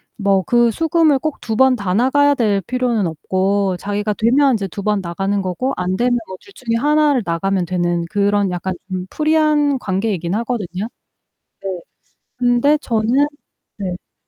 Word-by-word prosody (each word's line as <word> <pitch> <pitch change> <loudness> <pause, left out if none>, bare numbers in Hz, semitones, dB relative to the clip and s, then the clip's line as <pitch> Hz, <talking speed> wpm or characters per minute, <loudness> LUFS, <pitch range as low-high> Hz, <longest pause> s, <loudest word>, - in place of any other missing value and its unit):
뭐 195 -2 +1
그 240 +2 +3
수, 325 +8 -2
금을 310 -4 +3
꼭 310 0 -4
2 220 -2 -3
번 265 -1 +5
다 195 -5 -2
나가야 285 +5 +3
될 205 -5 +1
필요는 240 -6 0
없고 190 +4 0
자기가 205 +2 -2
되면 260 +6 +3
이제 200 -3 -1
2 200 +2 -7
번 210 -2 +1
나가는 195 +3 -2
거고 190 +9 -2
안 185 +1 -2
되면 245 0 +2
뭐 185 - -8
둘 395 - -18
중에 230 -2 -3
하나를 295 -2 +2
나가면 180 +2 0
되는 175 -1 -1
그런 205 -1 +1
약간 180 +1 -3 0.2
음 185 0 -4
프리한 305 -3 +2
관계이긴 190 -3 -2
하거든요. 215 -4 -3 0.8
네. 190 -3 -4 0.6
근데 245 +4 +3
저는 245 +3 +1 0.5
네. 200 - -4
네네네. 180 0 -7
210 Hz, 295 characters per minute, -18 LUFS, 190-255 Hz, 0.8 s, 번